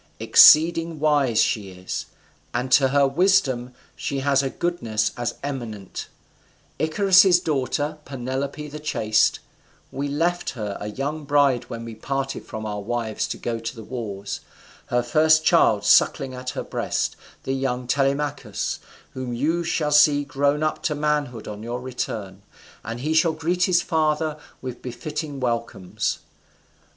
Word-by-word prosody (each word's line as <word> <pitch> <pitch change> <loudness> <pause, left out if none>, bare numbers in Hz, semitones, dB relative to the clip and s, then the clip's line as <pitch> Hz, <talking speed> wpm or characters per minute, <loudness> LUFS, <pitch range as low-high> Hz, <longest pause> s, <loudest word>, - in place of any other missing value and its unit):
Exceeding 165 0 +6
wise 145 -7 +2
she 100 -3 +1
is, 90 0 -6 0.5
and 125 +1 -2
to 135 +1 +6
her 140 +1 +3
wisdom 135 -6 +2 0.2
she 140 -1 -3
has 140 0 +3
a 135 - -2
goodness 115 -12 -1
as 120 -1 -3
eminent; 115 -9 -5 0.7
Icarius's 185 +2 +5
daughter, 150 -1 -1
Penelope 135 +3 -4
the 150 +1 -8
chaste: 110 -7 +1 0.5
we 140 +1 -3
left 170 +5 0
her 105 -3 -4
a 105 - -4
young 145 +7 -4
bride 140 -4 +3
when 115 0 -7
we 115 - -7
parted 135 +4 -4
from 110 0 -6
our 105 -1 -4
wives 115 0 -2
to - - -5
go 115 -1 -3
to 115 0 -5
the 115 - -9
wars, 105 -5 -5 0.5
her 120 0 +1
first 155 +5 +4
child - - +4
sucking 135 -1 +4
at 125 0 -5
her - - -2
breast, - - -2 0.3
the 135 - -2
young 130 -2 -2
Telemachus, 135 -3 -1 0.3
whom 130 -2 -5
you 160 +8 0
shall 160 -3 -1
see 150 -1 +5
grown 145 +1 0
up 155 - -1
to 150 - -1
manhood 145 -6 -1
on 105 0 -7
your 120 +2 -4
return, 110 -6 -5 0.4
and 115 +2 -6
he 155 +4 0
shall 160 0 +3
greet 175 +3 0
his 175 -2 +2
father 155 -1 0 0.2
with 125 -2 -6
befitting 150 +3 -5
welcomes. 115 -7 -2
135 Hz, 145 wpm, -23 LUFS, 120-150 Hz, 0.7 s, Exceeding